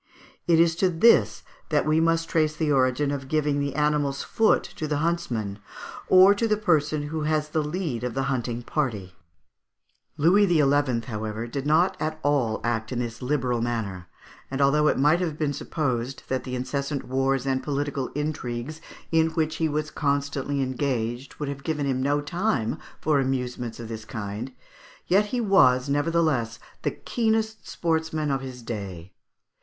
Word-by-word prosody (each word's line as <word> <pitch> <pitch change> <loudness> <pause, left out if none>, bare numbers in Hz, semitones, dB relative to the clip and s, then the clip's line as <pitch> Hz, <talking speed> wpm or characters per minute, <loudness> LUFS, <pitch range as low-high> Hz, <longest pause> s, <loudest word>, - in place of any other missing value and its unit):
It 165 -1 +5
is 165 -1 +4
to 185 +1 +3
this 165 - +4 0.3
that 150 -2 +2
we 155 +1 +3
must 165 0 +2
trace 155 -2 +1
the 155 -1 0
origin 135 +1 +2
of 135 -2 -4
giving 150 -1 +1
the 140 -1 -2
animal's 150 -2 +1
foot 225 -1 +2
to 155 - -3
the 150 -1 0
huntsman 120 -11 -2 0.5
or 185 +2 +7
to 225 +3 0
the 215 -1 +2
person 155 -6 +1
who 160 0 -3
has 155 -1 0
the 155 +1 0
lead 150 -5 -3
of 125 -1 -3
the 135 - 0
hunting 120 -3 -2
party. 110 - -2 1.0
Louis 190 +7 +5
XI., 145 -7 +3
however, 110 0 -4
did 135 +4 -4
not 165 +5 +3
at 155 0 -2
all 135 -7 +1
act 110 -1 -1
in 125 - -2
this 120 0 -4
liberal 125 -3 0
manner, 105 -7 -3 0.4
and 135 - -4
although 150 +2 +4
it - - +2
might 150 +5 +4
have 165 -5 -2
been 150 -2 0
supposed 135 -4 -3
that 130 -1 -1
the 130 -1 -4
incessant 140 +3 -3
wars 135 0 0
and 130 -1 0
political 140 -2 -2
intrigues 150 -1 -4 0.3
in 160 0 +4
which 160 -1 -1
he 160 -1 +1
was 150 0 -2
constantly 140 -1 -1
engaged 130 -1 -2
would 150 - -4
have 140 0 -5
given 150 -2 -1
him 130 -2 0
no 145 +2 +1
time 145 - -1 0.2
for 150 -2 +2
amusements 125 -3 -2
of 115 - -6
this 110 -1 -7
kind, 105 +4 -5 0.5
yet 200 +4 +3
he 245 +4 -2
was, 145 - +4
nevertheless, 145 -6 +1 0.2
the - - 0
keenest 220 -2 -1
sportsman 160 -2 -1
of 135 -1 0
his 130 -2 -8
day. 95 -6 -6
140 Hz, 170 wpm, -25 LUFS, 125-155 Hz, 1.0 s, or